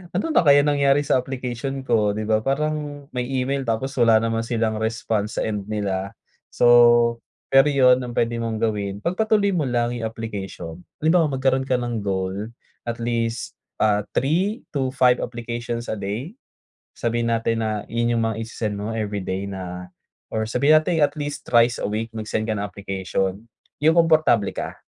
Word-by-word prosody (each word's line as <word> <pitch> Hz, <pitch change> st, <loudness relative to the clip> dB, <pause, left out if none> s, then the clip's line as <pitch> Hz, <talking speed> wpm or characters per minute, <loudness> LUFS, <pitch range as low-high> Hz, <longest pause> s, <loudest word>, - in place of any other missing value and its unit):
ano 185 Hz, -, +1 dB
na -, -, +5 dB
kaya 145 Hz, -2 st, +6 dB
nangyari 145 Hz, -1 st, +3 dB
sa 130 Hz, -, +3 dB
application 130 Hz, +1 st, -4 dB
ko, 105 Hz, -4 st, +2 dB
di 110 Hz, -, -3 dB
ba, 110 Hz, 0 st, +2 dB
parang 145 Hz, +1 st, -2 dB
may 125 Hz, -1 st, -2 dB
email 135 Hz, +1 st, -1 dB
tapos 125 Hz, +5 st, -1 dB
wala 115 Hz, -2 st, +6 dB
naman 115 Hz, 0 st, 0 dB
silang 115 Hz, -2 st, -1 dB
response 110 Hz, -1 st, -2 dB
sa -, -, 0 dB
end 105 Hz, -2 st, -3 dB
nila. 100 Hz, -2 st, -2 dB, 0.4 s
So 120 Hz, -1 st, +5 dB, 0.3 s
pero 135 Hz, +2 st, +6 dB
yun, 130 Hz, -2 st, +5 dB
ang 120 Hz, -1 st, -7 dB
puwede 115 Hz, 0 st, +1 dB
mong 115 Hz, -1 st, -2 dB
gawin, 105 Hz, -3 st, -1 dB
pagpatuloy 200 Hz, -, +1 dB
mo 170 Hz, -, +1 dB
lang 120 Hz, 0 st, 0 dB
yung 115 Hz, -2 st, -3 dB
application. 95 Hz, -6 st, -7 dB, 0.2 s
Halimbawa 160 Hz, 0 st, +3 dB
magkaroon 130 Hz, 0 st, +1 dB
ka 130 Hz, -, +3 dB
ng 120 Hz, -2 st, -3 dB
goal 95 Hz, +2 st, -2 dB, 0.4 s
at 115 Hz, -, -3 dB
least 115 Hz, -1 st, -2 dB, 0.2 s
ah, 105 Hz, -1 st, +2 dB, 0.2 s
3-5 135 Hz, -, +1 dB
applications 120 Hz, 0 st, -4 dB
a -, -, -3 dB
day. 110 Hz, -, -4 dB, 0.6 s
Sabihin 115 Hz, 0 st, -1 dB
natin 115 Hz, 0 st, 0 dB
na 110 Hz, -1 st, -3 dB
yun 120 Hz, 0 st, 0 dB
yung -, -, +1 dB
mga 110 Hz, -, -3 dB
ise-send 110 Hz, -2 st, -4 dB
mo 105 Hz, +2 st, -4 dB
everyday 100 Hz, -3 st, -3 dB
na 90 Hz, -2 st, -6 dB, 0.4 s
or 110 Hz, 0 st, -2 dB
sabihin 140 Hz, +7 st, +4 dB
natin 160 Hz, +1 st, +1 dB
at 145 Hz, +1 st, +2 dB
least 145 Hz, 0 st, -4 dB
thrice 120 Hz, 0 st, +4 dB
a -, -, -1 dB
week 110 Hz, +2 st, -3 dB
mag-send 110 Hz, 0 st, -3 dB
ka 110 Hz, -, -1 dB
ng 105 Hz, -, -2 dB
application, 95 Hz, -1 st, -3 dB, 0.4 s
yung 160 Hz, +2 st, +4 dB
komportable 155 Hz, -11 st, +4 dB
ka -, -, -5 dB
115 Hz, 165 wpm, -23 LUFS, 110-135 Hz, 0.6 s, kaya